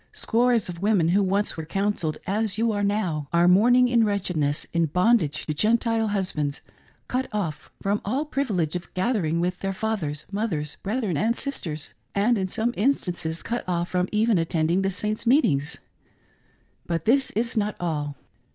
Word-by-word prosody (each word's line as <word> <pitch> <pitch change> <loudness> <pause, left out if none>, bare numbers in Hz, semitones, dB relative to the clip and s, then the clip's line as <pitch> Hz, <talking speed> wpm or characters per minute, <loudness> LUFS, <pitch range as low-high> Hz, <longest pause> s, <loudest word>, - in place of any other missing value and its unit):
Scores 235 -1 +2
of 175 -1 -7
women 200 -5 +3
who 195 +4 +3
once 200 +2 +1
were 160 - -5
counselled 195 -2 -1
as 205 +1 0
you 230 +1 +2
are 205 -1 -1
now, 185 -8 -1
are 170 +1 +4
mourning 245 +7 +5
in 240 -2 +3
wretchedness, 180 -8 0
in 170 -1 +2
bondage 180 -1 +2
to 155 - -2
Gentile 225 +5 +2
husbands, 170 -8 -1 0.5
cut 255 +1 -1
off 180 -8 -3
from 200 +1 0
all 260 +9 -1
privilege 205 - -1
of 175 - -5
gathering 185 -5 0
with 180 +1 -1
their 195 0 -2
fathers, 185 -9 -3
mothers, 185 -8 -2
brethren, 210 - -1
and 225 +6 +1
sisters; 160 - -5 0.2
and, 210 +5 +3
in 190 - -1
some 225 +5 -1
instances, 180 -9 -1
cut 240 +1 -2
off 175 0 -1
from 180 0 0
even 215 -2 +3
attending 165 +2 +1
the 195 - +1
Saints' 210 +4 -3
meetings. 155 - +3 1.1
But 165 -2 -2
this 265 +4 +3
is 235 +3 -1
not 210 -1 0
all. 150 -4 -2
195 Hz, 165 wpm, -25 LUFS, 170-225 Hz, 1.1 s, mourning